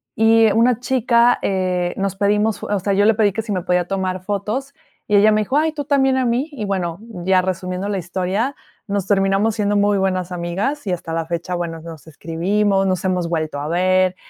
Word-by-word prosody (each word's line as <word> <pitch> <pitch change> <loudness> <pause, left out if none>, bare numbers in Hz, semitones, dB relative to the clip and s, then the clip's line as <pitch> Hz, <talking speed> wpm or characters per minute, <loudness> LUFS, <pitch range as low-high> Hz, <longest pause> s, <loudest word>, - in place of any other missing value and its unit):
y 225 0 +4
una 235 +1 +3
chica, 245 -1 +2
eh, 180 -2 -1
nos 195 0 -2
pedimos 210 +2 +1
fo - - -7
o 205 -1 0
sea 200 +2 -2
yo 205 +1 +3
le 225 - +5
pedí 210 -2 +3
que 225 - -2
si 220 - -7
me 185 -3 -1
podía 180 -1 +1
tomar 185 -1 -2
fotos, 210 +8 -3 0.3
y 205 - +3
ella 215 +2 +5
me 215 - +2
dijo: 260 +7 0
"Ay, 315 +1 +1
¿tú 290 -2 -4
también 270 -2 +2
a 260 - +1
mí?" 245 +5 0
Y 230 - -5
bueno, 180 -3 -2 0.3
ya 185 -1 +4
resumiendo 185 +1 -3
la 200 - -1
historia, 190 - -2 0.3
nos 200 -1 -2
terminamos 200 +2 +2
haciendo 205 -1 0
muy 205 0 +2
buenas 185 -2 -1
amigas, 195 +10 -3
y - - 0
hasta 165 -1 -5
la 165 0 -1
fecha, 170 +2 -4
bueno, 165 -2 -4
nos 165 -1 -11
escribimos, 195 +6 0
nos 185 -1 -1
hemos 180 -2 0
vuelto 155 -3 -2
a 145 - -4
ver. 185 +2 +2
195 Hz, 215 wpm, -20 LUFS, 180-220 Hz, 0.3 s, le